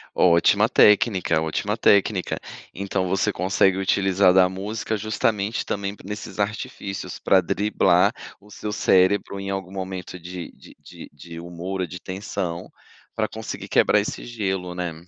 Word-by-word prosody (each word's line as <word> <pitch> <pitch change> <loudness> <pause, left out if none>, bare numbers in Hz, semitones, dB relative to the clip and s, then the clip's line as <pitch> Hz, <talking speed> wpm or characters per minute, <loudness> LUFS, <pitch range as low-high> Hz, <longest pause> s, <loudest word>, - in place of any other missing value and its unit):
Ótima 85 -2 +4
técnica, 95 -6 +4
ótima 100 +7 -2
técnica. 100 -3 +2 0.3
Então 95 0 -2
você 95 +3 +1
consegue 95 0 +2
utilizar 95 -1 +3
da 90 -1 +5
música 105 +3 -3
justamente 110 0 -1
também 100 0 -3
nesses 105 +2 -7
artifícios 100 -2 -4
pra 95 - +4
driblar 90 -1 +2 0.3
o 105 +2 -20
seu 105 +1 -6
cérebro 100 0 +2
em 100 0 -5
algum 95 -1 -4
momento 95 -1 -6
de 90 0 -8
de - - -17
de - - -12
de 85 +3 -10
humor 90 +3 -5
ou 90 - -1
de 90 - -8
tensão, 95 -2 -5 0.5
pra - - 0
conseguir - - -7
quebrar 105 - +4
esse 105 - -4
gelo, 95 -6 -3
né. 90 -1 -3
95 Hz, 145 wpm, -23 LUFS, 90-100 Hz, 0.5 s, da